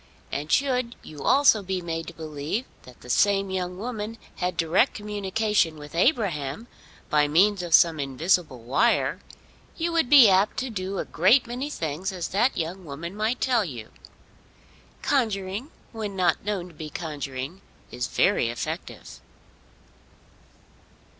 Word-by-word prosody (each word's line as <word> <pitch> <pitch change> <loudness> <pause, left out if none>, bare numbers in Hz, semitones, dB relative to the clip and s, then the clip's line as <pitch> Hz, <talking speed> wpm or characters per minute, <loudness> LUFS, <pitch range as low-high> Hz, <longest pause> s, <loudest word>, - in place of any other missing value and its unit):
And 150 +3 -4
should 250 -3 +1
you 150 -2 -10
also 275 -6 +5
be 190 -1 -2
made 165 -2 -4
to 170 - -7
believe 155 - -4 0.2
that 125 -1 -15
the 125 - -12
same 195 - +2
young 180 -1 -3
woman 225 0 -5 0.2
had 180 -1 -2
direct 165 +10 +2
communication 205 -4 0
with 150 0 -11
Abraham, 175 - 0 0.5
by 150 -1 +4
means 190 +6 +3
of 175 -2 +4
some 165 -2 +4
invisible 140 -1 0
wire, 135 - +2 0.6
you 335 +1 -1
would 330 -7 +1
be 275 -6 +9
apt 195 +1 +3
to 260 -1 -2
do 190 -1 -4
a - - -2
great 205 - +4
many 250 +4 -4
things 165 - -3
as 180 -3 -4
that 230 +7 +1
young 175 +4 -3
woman 165 +4 -7
might 220 +4 -1
tell 245 -4 +2
you. 120 - -8 1.1
Conjuring, 215 -2 -1 0.2
when 215 -3 -5
not 180 -3 +1
known 195 -4 -2
to - - -17
be 155 0 -7
conjuring, 145 +1 -5 0.3
is 125 - -3
very 115 - +2
effective. 115 - -6
185 Hz, 145 wpm, -25 LUFS, 155-220 Hz, 1.1 s, be